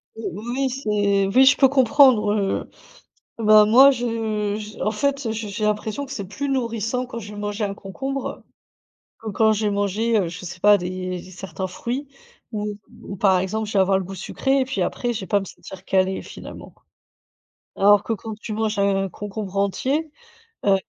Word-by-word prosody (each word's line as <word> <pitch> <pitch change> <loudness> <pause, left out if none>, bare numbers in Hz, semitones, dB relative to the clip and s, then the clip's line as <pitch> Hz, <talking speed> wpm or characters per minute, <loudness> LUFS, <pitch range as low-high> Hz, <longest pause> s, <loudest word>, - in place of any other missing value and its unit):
Ou 225 - -4
oui, 225 - -10
oui 270 -1 +1
c'est 205 -6 +1
oui, 255 +7 +5
je 280 - +7
peux 270 - +5
comprendre, 260 -5 +5
heu, 200 -2 -1 0.7
bah, 215 -1 +6
moi 260 +6 +7
je 225 -4 -2
j 210 0 -8
en - - +1
fait, 275 +4 -1
heu, 220 - -1
je 220 -1 -4
j'ai 210 +1 -3
l'impression 215 +6 -1
que 275 - -12
c'est 200 -7 -5
plus 280 +9 -4
nourrissant 235 -1 -1
quand 240 -2 -7
j'ai 210 -1 -9
mangé 205 +1 -3
un 200 -1 -2
concombre, 270 +8 -5 0.8
que 220 - -6
quand 220 +2 +3
j'ai 210 0 0
mangé, 205 +3 0
heu, 185 - 0
je 175 +2 -7
sais 180 +1 -8
pas, 205 0 +6
des 185 0 -4
certains 190 0 -6
fruits 245 +9 -4 0.4
ou 210 -1 -4 0.2
ou 200 - -7
par 190 -1 +3
exemple, 210 +4 -2
je - - -6
vais 195 - +3
avoir 190 0 +3
le - - -4
goût 190 +2 -8
sucré 270 +8 0
et 260 - 0
puis 265 - -3
après, 245 -1 -1
je 225 - -4
vais 190 - -7
pas 205 - +2
me 195 - -6
sentir 190 +1 -12
calée 190 0 +1
finalement. - - -10 1.0
Alors 205 +1 +5
que 230 - -2
quand 220 0 -6
tu 215 - -7
manges 215 0 -1
un 195 -1 +1
concombre 200 0 -6
entier, 270 +10 0 0.5
heu, 200 - +6
210 Hz, 195 wpm, -22 LUFS, 195-235 Hz, 1.0 s, je